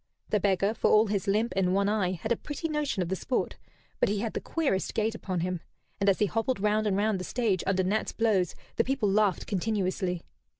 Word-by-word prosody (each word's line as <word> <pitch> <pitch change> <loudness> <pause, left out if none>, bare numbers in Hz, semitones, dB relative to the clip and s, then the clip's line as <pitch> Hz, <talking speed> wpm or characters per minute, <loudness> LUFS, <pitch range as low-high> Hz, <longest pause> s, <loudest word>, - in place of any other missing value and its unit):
The 210 - +3
beggar, 195 +1 +2
for 225 - +1
all 215 +1 +6
his 205 -1 -2
limp 215 +4 +1
and 185 -1 +2
one 200 0 +2
eye, 200 -3 +1
had 190 +6 -5
a - - +5
pretty 295 +7 -5
notion 300 - -1
of 170 - -5
the 190 - 0
sport, 250 +6 -2 0.4
but - - +3
he 205 - 0
had 220 +2 -2
the - - -3
queerest 280 - -1
gait 220 +1 +1
upon 185 -5 -3
him; 180 -1 -2 0.4
and 200 0 +3
as 195 - +3
he 210 - +3
hobbled 225 +4 -1
round 210 +1 +2
and 195 -2 +1
round 210 -1 +1
the - - -4
stage 210 -5 0
under 190 -1 +2
Nat's 205 +4 0
blows 210 -6 +1 0.2
the - - +4
people 250 -6 0
laughed 205 -3 +2
continuously. 185 -3 -1
205 Hz, 225 wpm, -28 LUFS, 190-225 Hz, 0.4 s, all